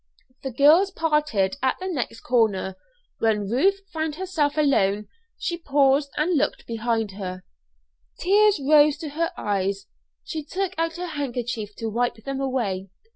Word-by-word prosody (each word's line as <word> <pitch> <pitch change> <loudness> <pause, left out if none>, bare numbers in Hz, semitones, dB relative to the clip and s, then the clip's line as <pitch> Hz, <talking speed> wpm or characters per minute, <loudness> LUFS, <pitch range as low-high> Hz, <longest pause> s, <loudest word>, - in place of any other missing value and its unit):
The 265 - -3
girls 300 - +5
parted 300 - 0
at 260 0 +1
the 375 - -4
next 250 -9 -3
corner. 215 -6 +1 0.4
When 210 -3 +1
Ruth 380 - +2
found 315 -2 -2
herself 320 -5 -1
alone 210 -9 +2 0.3
she 345 -1 -3
paused 280 -2 +3
and 330 +4 +2
looked 295 - 0
behind 225 -2 -1
her. 185 -2 -6 0.7
Tears 410 0 +4
rose 295 +1 +5
to 310 -1 -6
her 330 +4 -1
eyes; 195 -1 -1 0.4
she 315 -2 -5
took 380 +4 -3
out 330 0 0
her 360 - -3
handkerchief 245 - -4
to 225 - -4
wipe 240 +3 0
them 270 +5 -5
away. 210 -8 -2
275 Hz, 145 wpm, -24 LUFS, 220-315 Hz, 0.7 s, girls